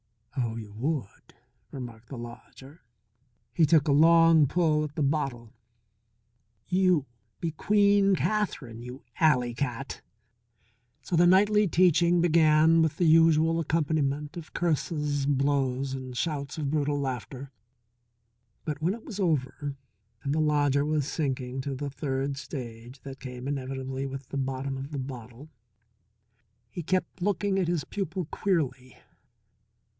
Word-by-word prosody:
"Oh, 120 -4 -1
you 110 -3 -8
would!" 130 -1 -4 0.3
remarked 120 -4 -9
the 135 - -7
lodger. 130 +5 -11 0.7
He 160 - +4
took 155 0 +4
a - - +3
long 165 0 +6
pull 155 0 +2
at 150 -1 -6
the 155 - 0
bottle. 135 -6 -2 1.1
"You 180 -5 +2 0.3
be 165 - -2
Queen 200 +3 +3
Kathrine, 180 - -2
you 125 +2 -9 0.2
alley 125 -7 +3
cat." 125 +1 -4 1.0
So 175 - -2
the 175 +1 +5
nightly 205 +3 +4
teaching 175 0 +4
began 160 -1 +5
with 160 -1 0
the 175 - +2
usual 165 0 +5
accompaniment 150 -1 -1
of 165 -2 -9
curses, 150 -3 -1
blows, 135 -1 0
and 130 -2 -6
shouts 145 -2 -3
of 145 -3 -2
brutal 145 -1 0
laughter. 130 0 -5 1.1
But 150 -1 -4
when 180 +6 +1
it 230 - -14
was 210 -3 -7
over 145 -4 -1 0.5
and 140 - -1
the 155 - +1
lodger 145 -2 +2
was 150 -2 0
sinking 135 -4 -2
to 140 0 -4
the 140 +1 -4
third 135 -1 -2
stage 120 -2 -8
that 135 -1 -9
came 125 0 -7
inevitably 135 -1 -4
with 135 -1 -8
the - - -4
bottom 135 0 -3
of 135 +2 -7
the 145 - -4
bottle, 130 +1 -8 1.2
he 175 - -5
kept 185 +2 -2
looking 200 0 0
at 180 - 0
his 170 -4 0
pupil 190 0 -4
queerly. 135 -9 -1
145 Hz, 135 wpm, -27 LUFS, 130-165 Hz, 1.2 s, long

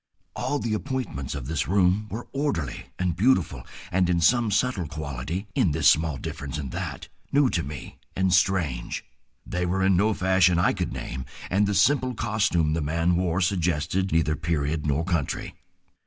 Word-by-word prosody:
All 145 - -1
the 115 -5 -2
appointments 110 - -3
of 70 -4 -5
this 80 +4 -1
room 95 +2 +2
were 110 +4 -5
orderly 135 - -2
and 90 -3 0
beautiful, 95 - +1 0.2
and 90 -1 +2
in 85 -1 +2
some 115 +7 +3
subtle 100 -5 0
quality, 80 - -4
in 80 - +2
this 80 0 +6
small 80 -4 0
difference 70 +3 -5
and 70 -4 -5
that, - - -5 0.2
new 140 -2 +4
to 85 - +1
me 70 -3 -8 0.2
and 95 -1 +2
strange. 85 -10 +1 0.4
They 90 0 -2
were 95 +2 0
in 95 0 +4
no 105 +4 +2
fashion 95 -2 +3
I 85 - +3
could - - -2
name, 65 0 -5 0.3
and 100 +2 +3
the 100 - 0
simple 130 - +3
costume 105 -9 +1
the 80 - 0
man 85 +4 +1
wore 90 0 0
suggested 90 0 0
neither 80 -1 +2
period 75 -1 -1
nor 75 +3 +1
country. 85 -6 -2
85 Hz, 170 wpm, -25 LUFS, 75-100 Hz, 0.4 s, this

